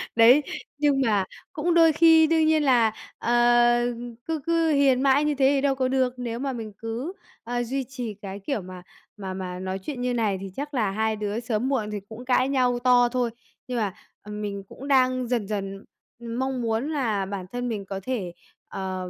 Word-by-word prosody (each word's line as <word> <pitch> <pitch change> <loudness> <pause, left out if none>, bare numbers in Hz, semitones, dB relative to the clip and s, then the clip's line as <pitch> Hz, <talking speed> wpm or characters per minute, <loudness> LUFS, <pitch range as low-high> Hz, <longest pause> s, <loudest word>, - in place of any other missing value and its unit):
Đấy, 245 +6 +7 0.3
nhưng 285 -2 +2
mà 210 -6 +2 0.3
cũng 335 +3 0
đôi 330 -1 +6
khi 320 0 +6
đương 320 -1 +3
nhiên 310 -1 +3
là, 235 -5 +4 0.2
ờ, 235 - -2 0.9
cứ 320 -1 -2
cứ 330 -1 +2
hiền 275 -3 +3
mãi 275 +2 +4
như 300 -1 +1
thế 265 0 +2
thì 270 - +1
đâu 280 -1 +2
có 260 -1 0
được. 260 -1 +1
Nếu 235 -1 -4
mà 270 -1 -2
mình 220 -3 -6
cứ, 235 +10 -5 0.3
ờ, 240 +1 -2
duy 265 +3 -2
trì 245 -4 -6
cái 200 0 -8
kiểu 220 +1 -3
mà 180 0 -10 0.4
mà 190 -2 -5
mà 180 -1 -5
nói 190 +1 -4
chuyện 250 +5 -6
như 250 0 0
này 215 -5 0
thì 195 - -6
chắc 290 +1 -5
là 215 -6 +1
hai 220 +1 0
đứa 210 +1 -3
sớm 240 +1 -1
muộn 220 -6 -1
thì 205 - -3
cũng 230 +3 -9
cãi 255 +1 +2
nhau 250 -3 +2
to 245 -1 +4
thôi. 245 -1 0 0.4
Nhưng 250 -1 -3
mà, 205 -4 -1 0.3
ừm, 210 0 -7
mình 200 -1 -4
cũng 275 - -9
đang 255 -2 +3
dần 235 -5 -1
dần 195 -1 -4 0.3
mong 245 +2 -3
muốn 230 +5 -1
là 225 -9 0
bản 190 -1 -5
thân 245 0 -3
mình 205 -4 -4
có 195 0 -5
thể, 200 -8 -3 0.3
ờ, 185 -1 -4
245 Hz, 205 wpm, -25 LUFS, 210-270 Hz, 0.9 s, Đấy